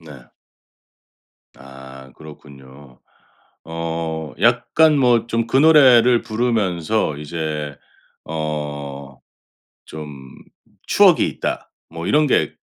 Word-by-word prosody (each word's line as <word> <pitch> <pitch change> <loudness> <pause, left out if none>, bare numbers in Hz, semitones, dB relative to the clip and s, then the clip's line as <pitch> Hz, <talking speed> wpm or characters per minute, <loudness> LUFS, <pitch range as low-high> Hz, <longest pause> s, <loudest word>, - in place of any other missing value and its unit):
네. 75 -6 -14 1.3
아, 65 0 -13
그렇군요. 70 -3 -15 0.7
어 80 -1 -5
약간 155 -2 +3
뭐 120 -4 +2
좀 115 0 -2
그 130 - 0
노래를 130 -6 +5
부르면서 110 -7 -1
이제 75 -1 -5 0.5
어 75 -3 -6 0.7
좀 75 -1 -9 0.8
추억이 - - +4
있다, - - -5 0.2
뭐 85 +1 -7
이런 150 +1 +2
게 - - +1
80 Hz, 150 characters per minute, -19 LUFS, 70-115 Hz, 1.3 s, 노래를